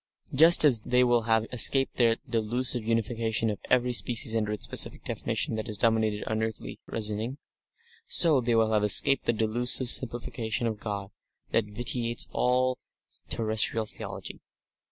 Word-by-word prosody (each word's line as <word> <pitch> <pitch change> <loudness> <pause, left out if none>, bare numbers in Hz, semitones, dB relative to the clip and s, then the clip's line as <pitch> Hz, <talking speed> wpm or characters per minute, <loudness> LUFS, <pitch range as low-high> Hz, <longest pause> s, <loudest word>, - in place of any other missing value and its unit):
Just 160 +4 +6
as 130 -6 +5
they 125 +3 +1
will 120 -1 +2
have 110 0 +2
escaped 135 +2 +3
that 115 -2 +2
delusive 120 +1 -1
unification 115 0 -2
of 105 - -7
every 125 0 +1
species 115 +1 -1
under 105 -2 -2
its 105 - -2
specific - - -1
definition - - -3
that 110 - -4
has 105 -2 -4
dominated 110 -1 0
earthly 110 - -5
reasoning, 110 +4 -4 0.7
so 155 -6 +5
they 120 -1 -1
will 110 -1 +1
have 105 -1 +1
escaped 120 +6 +5
the - - +3
delusive 120 +3 +1
simplification 120 -2 -1
of 110 -2 -4
God 100 -2 -6 0.4
that 115 - +1
vitiates 115 +2 -3
all 125 +1 0 0.5
terrestrial 110 0 0
theology. - - -9
115 Hz, 145 wpm, -26 LUFS, 110-125 Hz, 0.7 s, Just